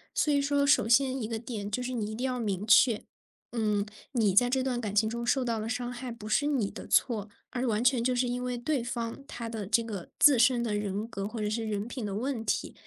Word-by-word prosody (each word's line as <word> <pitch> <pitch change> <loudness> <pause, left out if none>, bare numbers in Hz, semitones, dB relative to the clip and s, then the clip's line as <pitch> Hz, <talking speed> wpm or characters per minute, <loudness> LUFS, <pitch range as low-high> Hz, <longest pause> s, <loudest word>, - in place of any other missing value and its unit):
所 300 - +2
以 285 - +3
说 280 0 +2
首 275 -6 +4
先 260 +2 +3
一 220 - -2
个 225 0 -3
点 220 -3 -5
就 250 +5 -2
是 255 +1 -3
你 215 -3 -2
一 - - -5
定 250 +4 -3
要 255 -1 -1
明 205 -3 -2
确， 220 0 +5 0.5
嗯， 210 -3 0 0.3
你 220 -6 +2
在 245 +5 +5
这 260 +1 +1
段 250 -2 -1
感 210 -3 -4
情 220 +1 +4
中 235 +2 -3
受 255 +2 +1
到 230 -2 -1
了 215 +1 -4
伤 245 +2 -2
害 245 0 -6
不 225 -2 -9
是 275 +7 +2
你 260 -9 0
的 - - -9
错， 220 -5 +2 0.2
而 255 +1 -2
完 220 0 +1
全 250 -1 +3
就 250 +1 +1
是 250 0 +1
因 245 +1 -2
为 250 -1 -2
对 250 +1 -1
方 235 +2 -4
他 235 -1 -6
的 220 -4 -5
这 230 +3 +2
个 205 -6 -6
自 280 -5 +6
身 245 0 +4
的 225 -3 -1
人 205 +1 -2
格 195 -3 -4
或 225 +2 -6
者 210 - -1
是 220 +2 -2
人 210 0 -2
品 245 0 -6
的 200 -2 -3
问 245 +1 -2
题， - - -1
235 Hz, 280 characters per minute, -29 LUFS, 215-250 Hz, 0.5 s, 自